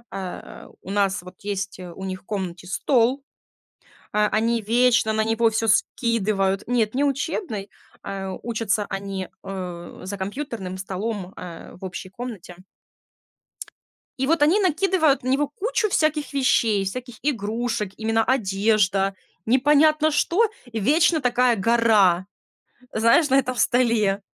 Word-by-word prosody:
э, 190 -2 -7
у 190 - -8
нас 200 -1 +1
вот 180 +1 -12
есть, 200 -1 -3
э, 180 -1 -8
у 190 - -9
них 185 -1 -5
в - - -40
комнате 180 -4 -5
стол, 255 +6 +1 0.9
э, 210 0 +3
они 230 0 +1
вечно 230 0 +3
на 220 0 +1
него 225 +1 0
всё 225 +1 -1
скидывают. 200 -3 +1
Нет, 235 -2 +1
не 280 - +2
учебный, 275 - -2 0.3
э, 195 -1 -5
учатся 220 -3 -1
они, 195 -1 -4 0.2
э, 180 -3 -7
за 200 +2 -5
компьютерным 195 -2 -5
столом, 195 0 -4
э, 175 -2 -9
в 190 - -7
общей 185 0 -7
комнате. 210 -5 -8 1.6
И 265 - 0
вот 325 0 +2
они 325 +8 +5
накидывают 345 -6 +2
на 255 - -2
него 280 +3 +2
кучу 425 - -1
всяких 310 -4 0
вещей, 230 -7 +2
всяких 245 +4 -5
игрушек, 225 -5 -2
именно 225 0 +1
одежда, 200 -4 +1 0.3
непонятно 300 +5 +4
что, 350 +9 +2 0.3
вечно 305 - +3
такая 250 -1 +3
гора, 210 -4 +3 0.7
знаешь, 230 +8 +4
на 270 +1 +5
этом 255 -1 -2
столе. 230 -6 +2
225 Hz, 135 wpm, -23 LUFS, 195-260 Hz, 1.6 s, они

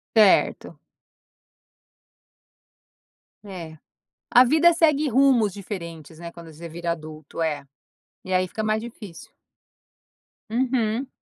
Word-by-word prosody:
Certo. 210 -3 +3 2.7
É. 170 -5 -8 0.6
A 245 - +8
vida 320 +6 +5
segue 310 -3 +2
rumos 245 -5 +4
diferentes, 170 -5 -8
né, 170 0 -8
quando 170 -1 -12
você 165 +3 -10
vira 170 +1 -3
adulto 155 0 -7
é, 150 -3 -2 0.6
e 185 - -3
aí 185 0 +3
fica 220 - -5
mais 215 0 0
difícil. 220 -7 -10 1.2
Uhum. 245 0 0
200 Hz, 100 wpm, -24 LUFS, 165-240 Hz, 2.7 s, A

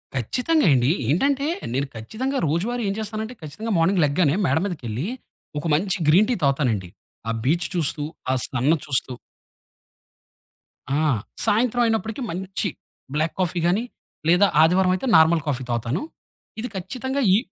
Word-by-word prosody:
ఖచ్చితంగా 250 - +1
అండి. 125 +2 +3 0.2
ఏంటంటే, 275 - +2 0.3
నేను 135 +1 0
ఖచ్చితంగా 255 - -3
రోజువారి 220 +10 -1
ఏం - - 0
చేస్తానంటే, 220 +3 -4
ఖచ్చితంగా 190 +10 -5
మార్నింగ్ 170 +3 +3
లెగ్గానే 150 +1 +2
మేడ 140 +4 +2
మీదకెళ్ళీ, 135 - -4 0.5
ఒక - - -8
మంచి 190 +4 0
గ్రీన్ 195 +8 +5
టీ 245 - +2
తావుతానండి, 125 - +1 0.4
ఆ - - +1
బీచ్ 170 +5 +1
చూస్తూ, 155 -3 0 0.3
ఆ - - +3
సన్ను 135 +5 +1
చూస్తూ. 130 -2 0 1.9
ఆ! - - +1 0.4
సాయంత్రం 240 +3 +2
అయినప్పడకీ 225 +2 -1
మంచి 190 +3 -2 0.5
బ్లాక్ 155 +2 0
కాఫీ 180 -1 0
గానీ 195 +7 +2 0.4
లేదా 180 +4 +5
ఆదివారవయితే 185 +7 +3
నార్మల్ 160 0 +4
కాఫీ 135 -2 -1
తాగుతాను. 120 +5 -1 0.6
ఇది 245 - -3
ఖచ్చితంగా 260 +9 -3
ఇ - - +6
175 Hz, 135 wpm, -23 LUFS, 145-220 Hz, 1.9 s, ఇ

